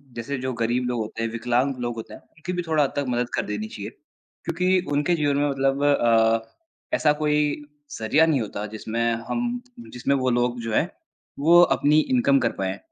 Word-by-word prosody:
जैसे 125 +4 -4
जो 130 0 -2
गरीब 120 +2 +1
लोग 120 -1 -1
होते 110 +1 -4
हैं, 115 - -1
विकलांग 125 +4 0
लोग 120 -1 -3
होते 115 - -8
हैं, - - -11
उनकी 170 +3 -8
भी 180 - -1
थोड़ा 155 -2 +3
हद 140 - -1
तक 145 -1 -1
मदद 120 0 -1
कर - - -1
देनी 105 +1 -4
चाहिए। 105 -1 -7 0.6
क्योंकि 180 +2 +2
उनके 145 +4 +2
जीवन 145 -3 +1
में 145 0 +1
मतलब 135 0 0
अ, 115 -5 +2 0.4
ऐसा 150 - +3
कोई 150 -1 0 0.3
ज़रिया 145 +9 +3
नहीं 150 -6 +1
होता 105 -1 -5
जिसमें 110 +2 -4 0.3
हम 240 - -2 0.3
जिसमें 130 +3 0
वो 130 -1 +1
लोग 120 0 0
जो 115 -1 -4
हैं - - +2 0.5
वो 170 +4 +6 0.2
अपनी 150 +2 +4
इनकम 155 - +3
कर 120 - +1
पाएँ। 95 +1 -2
135 Hz, 195 wpm, -24 LUFS, 115-150 Hz, 0.6 s, वो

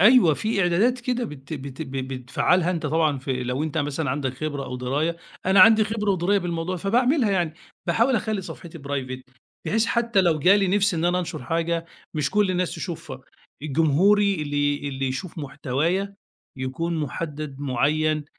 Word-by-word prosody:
أيوه 210 - +7
في 215 +2 -1
إعدادات 215 +9 +2
كده 250 -1 -1
بت 140 -5 -9
بت 140 0 -6
بتفعّلها 135 +6 0
أنتَ 165 -4 -2
طبعًا 155 -2 +1
في 130 -1 -3
لو 125 +4 -1
أنتَ 160 +1 -2
مثلًا 145 -1 -1
عندَك 130 -1 -2
خبرة 145 -1 -4
أو 125 - -5
دراية، 145 +7 -1 0.3
أنا 190 0 +5
عندي 220 +2 +8
خبرة 215 -1 -1
ودراية 190 +2 +2
بالموضوع 175 0 -3
فباعملها 245 - +2
يعني، 175 -5 0 0.3
باحاول 240 +2 +3
أخلّي 215 -2 -1
صفحتي 170 -2 -9
private 130 -2 -5 0.3
بحيث 225 +1 +2
حتّى 235 -4 +2
لو 170 -4 +2
جا 185 +7 +6
لي 195 -2 +2
نفس 200 0 +2
إن 165 +1 -1
أنا 175 +1 +2
أنشر 175 -7 -4
حاجة، 165 +3 -1 0.3
مش 150 -2 0
كل 210 -2 +2
الناس 180 -1 -1
تشوفها، 155 -7 -6 0.4
جمهوري 170 +8 +3
اللي 145 0 -1
اللي 135 -1 -3
يشوف 160 +7 -5
محتوايا 155 +7 -1 0.4
يكون 150 +7 -2
محدّد 150 -1 -5
معيّن. 150 +3 +1
165 Hz, 165 wpm, -24 LUFS, 140-195 Hz, 0.4 s, عندي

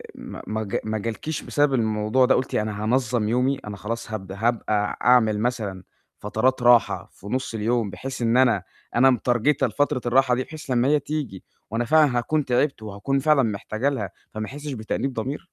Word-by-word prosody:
ما - - -9
ما 110 +1 -2
جا 105 +4 -2
ما 110 0 -2
جالكيش 115 +8 -4
بسبب 145 -2 +1
الموضوع 110 +2 +2
ده 130 - +4
قُلتِ 130 - -1
أنا 105 -1 -2
هانظّم 120 -1 +1
يومي، 125 +4 +1
أنا 100 -1 -6
خلاص 115 +2 -5
هابد 95 -3 -5
هابقى 105 -1 0
أعمل 110 -4 +4
مثلًا 105 -6 -2 0.4
فترات 125 +5 0
راحة 120 -1 +4
في 100 - -14
نص 130 +1 -2
اليوم، 110 0 0
بحيث 130 +4 -6
إن 115 +1 +2
أنا 115 -7 +3 0.3
أنا 130 +3 +6
مترجِتة 125 +3 +2
لفترة 145 -3 0
الراحة 125 0 +3
دي 130 - -1
بحيث 155 -2 -11
لمّا 125 +1 +2
هي 150 0 +4
تيجي 140 -10 -5 0.3
وأنا 120 +1 -1
فعلًا 150 -2 +4
هاكون 150 +4 0
تعبت 125 -1 +1
وهاكون 110 +7 -2
فعلًا 145 -1 +4
محتاجة 110 +4 -1
لها 105 -9 -3 0.2
فما 110 0 -3
أحسش 145 +1 -7
بتأنيب 125 +4 -3
ضمير؟ 130 +6 -3
120 Hz, 180 wpm, -24 LUFS, 110-135 Hz, 0.4 s, أنا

